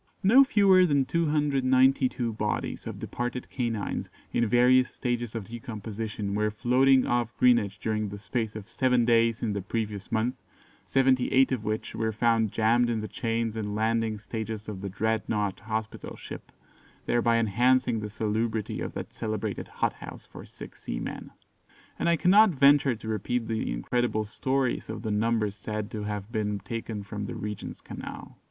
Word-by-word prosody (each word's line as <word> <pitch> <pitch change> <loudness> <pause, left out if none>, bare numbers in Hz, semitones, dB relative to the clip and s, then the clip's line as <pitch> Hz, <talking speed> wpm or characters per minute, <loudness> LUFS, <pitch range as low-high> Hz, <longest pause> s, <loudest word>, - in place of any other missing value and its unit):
"No 245 +8 +8
fewer 200 -8 +5
than 140 -3 +2
292 135 -6 +2
bodies 105 0 -3
of - - -5
departed 125 +1 -4
canines, 115 -5 -2 0.2
in 120 - +2
various 125 +3 +5
stages 120 -2 -3
of 115 - -3
decomposition, 110 -2 -5
were 105 +1 +1
floating 130 +4 +3
off 120 -1 -1
Greenwich 115 -6 +3
during 110 -1 -1
the 100 - -7
space 110 +1 -3
of 110 -3 -7
seven 125 -2 +2
days 115 -1 +3
in 110 -3 0
the 100 - -2
previous 105 0 -4
month, 115 +3 +1 0.5
seventy 130 -1 +3
eight 135 +1 +4
of 125 -5 -1
which 110 0 -3
were 110 0 -1
found 110 -1 +2
jammed 120 +2 +3
in 115 -2 -1
the 110 - -4
chains 115 +1 -2
and 105 -2 -3
landing 110 0 0
stages 110 0 -5
of 100 -3 -6
the 100 - -4
"Dreadnought" 105 -1 -1
hospital 110 0 -5
ship, - - -9 0.5
thereby 115 -1 +2
enhancing 120 +2 +2
the 105 0 -5
salubrity 110 0 -2
of - - -4
that - - -6
celebrated 110 -2 -3
hothouse - - -4
for - - -11
sick - - -11
seamen." - - -5 0.7
And - - +1
I 170 - +4
cannot 205 +6 +6
venture 140 -4 +4
to 110 - -10
repeat 110 +2 -1
the 110 -1 -2
incredible 110 - 0
stories 130 +4 -1
of 110 0 -5
the 110 - -2
numbers 110 -1 +1
said 105 0 -5
to 110 - -4
have 105 0 -4
been 105 -3 -1
taken 110 0 -5
from 105 0 -5
the - - -5
Regent's 105 -1 -6
Canal. - - -9
115 Hz, 160 wpm, -27 LUFS, 105-125 Hz, 0.7 s, No